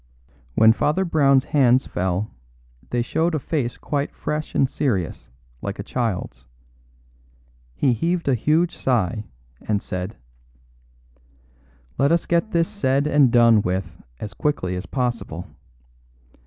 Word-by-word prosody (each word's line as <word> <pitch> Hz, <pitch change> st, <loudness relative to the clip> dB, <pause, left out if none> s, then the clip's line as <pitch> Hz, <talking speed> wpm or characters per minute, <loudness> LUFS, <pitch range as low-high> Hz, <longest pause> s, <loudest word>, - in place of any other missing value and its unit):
When 110 Hz, 0 st, +6 dB
Father 155 Hz, +10 st, +1 dB
Brown's 140 Hz, -6 st, +4 dB
hands 130 Hz, -2 st, +3 dB
fell 95 Hz, +3 st, -2 dB, 0.6 s
they 120 Hz, -1 st, 0 dB
showed 165 Hz, +6 st, 0 dB
a -, -, 0 dB
face 135 Hz, -4 st, -2 dB
quite 145 Hz, -1 st, -3 dB
fresh 150 Hz, 0 st, -4 dB
and 135 Hz, -, +4 dB
serious, 105 Hz, -, -2 dB, 0.3 s
like 100 Hz, 0 st, -4 dB
a 100 Hz, -, -5 dB
child's. 100 Hz, -, -3 dB, 1.3 s
He 130 Hz, -3 st, +2 dB
heaved 170 Hz, +8 st, -1 dB
a 135 Hz, -, +4 dB
huge 155 Hz, +8 st, +1 dB
sigh, 110 Hz, -4 st, 0 dB, 0.4 s
and 105 Hz, -2 st, 0 dB
said: 90 Hz, +1 st, -5 dB, 1.8 s
"Let 140 Hz, +2 st, +3 dB
us 170 Hz, 0 st, +2 dB
get 170 Hz, +5 st, +1 dB
this 165 Hz, -4 st, +1 dB
said 140 Hz, -8 st, 0 dB
and 145 Hz, -4 st, +4 dB
done 115 Hz, -3 st, +6 dB
with 90 Hz, -3 st, -3 dB, 0.2 s
as 100 Hz, +3 st, -6 dB
quickly 95 Hz, -7 st, -1 dB
as 90 Hz, 0 st, -5 dB
possible. 120 Hz, -, -3 dB
125 Hz, 130 wpm, -22 LUFS, 100-150 Hz, 1.8 s, When